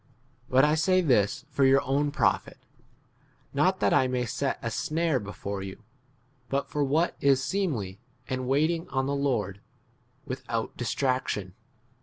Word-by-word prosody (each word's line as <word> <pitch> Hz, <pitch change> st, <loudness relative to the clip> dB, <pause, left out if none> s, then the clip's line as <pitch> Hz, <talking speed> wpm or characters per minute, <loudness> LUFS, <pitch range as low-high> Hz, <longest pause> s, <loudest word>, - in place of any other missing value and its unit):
But 130 Hz, +2 st, +5 dB
I 150 Hz, -, +3 dB
say 185 Hz, +4 st, +3 dB
this 130 Hz, -, +2 dB
for 140 Hz, 0 st, +1 dB
your 135 Hz, +1 st, +5 dB
own 140 Hz, +2 st, +1 dB
profit; -, -, 0 dB, 1.0 s
not -, -, +2 dB
that -, -, +3 dB
I 130 Hz, -, +4 dB
may 125 Hz, -1 st, -1 dB
set 115 Hz, -, -1 dB
a -, -, -2 dB
snare 160 Hz, -3 st, 0 dB
before 100 Hz, -1 st, -5 dB
you, 95 Hz, +3 st, -8 dB, 0.7 s
but 140 Hz, +2 st, -1 dB
for 150 Hz, -, -1 dB
what 155 Hz, +5 st, +1 dB
[is] 135 Hz, -1 st, +4 dB
seemly, 130 Hz, -, -2 dB, 0.3 s
and 130 Hz, -1 st, -3 dB
waiting 160 Hz, +5 st, +1 dB
on 130 Hz, -1 st, 0 dB
the 140 Hz, -, -1 dB
Lord 125 Hz, -9 st, 0 dB
36 100 Hz, -, -30 dB, 0.6 s
without 120 Hz, -4 st, -4 dB
distraction. 125 Hz, -7 st, -1 dB
135 Hz, 150 wpm, -27 LUFS, 115-145 Hz, 1.0 s, But